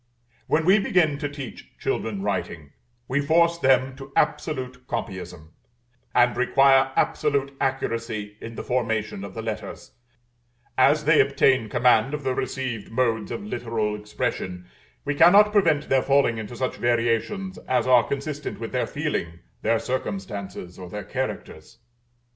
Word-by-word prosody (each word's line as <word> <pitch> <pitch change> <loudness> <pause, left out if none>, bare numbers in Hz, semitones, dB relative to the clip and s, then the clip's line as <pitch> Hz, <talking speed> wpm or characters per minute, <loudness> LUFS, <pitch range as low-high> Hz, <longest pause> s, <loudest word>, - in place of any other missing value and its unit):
When 155 +1 +1
we 195 +4 +6
begin 160 -7 +2
to 145 -2 -2
teach 140 -3 -9
children 105 -3 -2
writing, 80 -7 -3 0.4
we 140 +3 +1
force 170 +3 +3
them 130 -2 +3
to 135 -1 -10
absolute 130 -4 -1
copyism, 95 -8 -5 0.7
and 120 0 +4
require 135 +2 +4
absolute 140 -2 0
accuracy 115 -5 -2
in 115 0 -8
the - - -5
formation 110 -5 -1
of 100 - -8
the 115 - -5
letters; 110 -1 -6 0.8
as 145 +4 +4
they 155 +1 +6
obtain 135 -4 +2
command 120 +3 +3
of 145 - -7
the 130 -1 0
received 125 -5 -3
modes 115 -2 0
of 205 - -5
literal 115 - -2
expression, 100 -3 -4 0.4
we 145 - 0
cannot 195 +8 +6
prevent 160 -8 +2
their 135 -1 +3
falling 135 -5 +2
into 110 +2 -7
such 130 +2 -2
variations 120 - 0
as 130 - +1
are 125 -2 +6
consistent 145 +1 -4
with - - -5
their - - -1
feeling, 85 0 -3 0.2
their 115 +1 +2
circumstances, 105 - -5
or 90 -1 -8
their 105 +3 -6
characters. 80 +9 -5
125 Hz, 140 wpm, -24 LUFS, 110-145 Hz, 0.8 s, we